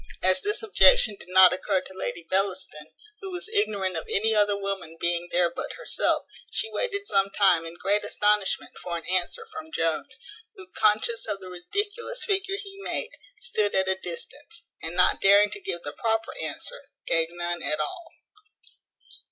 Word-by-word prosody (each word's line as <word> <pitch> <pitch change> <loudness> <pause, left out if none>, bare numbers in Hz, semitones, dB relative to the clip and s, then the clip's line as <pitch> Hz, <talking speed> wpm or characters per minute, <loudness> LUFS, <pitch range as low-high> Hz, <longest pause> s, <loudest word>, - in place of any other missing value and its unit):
As 185 +7 +3
this 420 +2 0
objection 445 - +5
did - - -13
not 185 0 +8
occur 190 +1 0
to 190 - -11
Lady 170 -2 -4
Bellaston, 185 -5 -1 0.3
who 390 - -7
was 360 +1 -5
ignorant 205 - 0
of 160 - -4
any 220 +2 +2
other 205 -1 +3
woman 195 -5 -4
being 170 0 0
there 175 -1 +3
but - - -5
herself, - - 0 0.2
she 445 - -2
waited 405 -3 -1
some 195 0 +2
time 190 -5 +3
in 165 - -9
great 200 +4 +1
astonishment 210 -1 +1
for 170 -1 -3
an 165 - -9
answer 185 - -1
from 320 -5 -8
Jones, 165 - -1 0.4
who, 385 -3 -11
conscious 220 +2 +1
of 205 -2 -2
the 185 -1 -10
ridiculous 410 - -3
figure 390 -1 0
he 395 -1 -9
made, 460 +4 -3 0.3
stood 215 - 0
at 190 0 +2
a 190 - +3
distance, 290 - -7 0.2
and, 165 +1 -5
not 180 - +4
daring 200 +1 +6
to - - -6
give 170 - -4
the 145 - -6
proper 225 0 -1
answer, - - -5 0.2
gave 165 -1 +2
none 175 0 -4
at 155 +2 -1
all. 150 - -3
200 Hz, 175 wpm, -26 LUFS, -, 0.4 s, not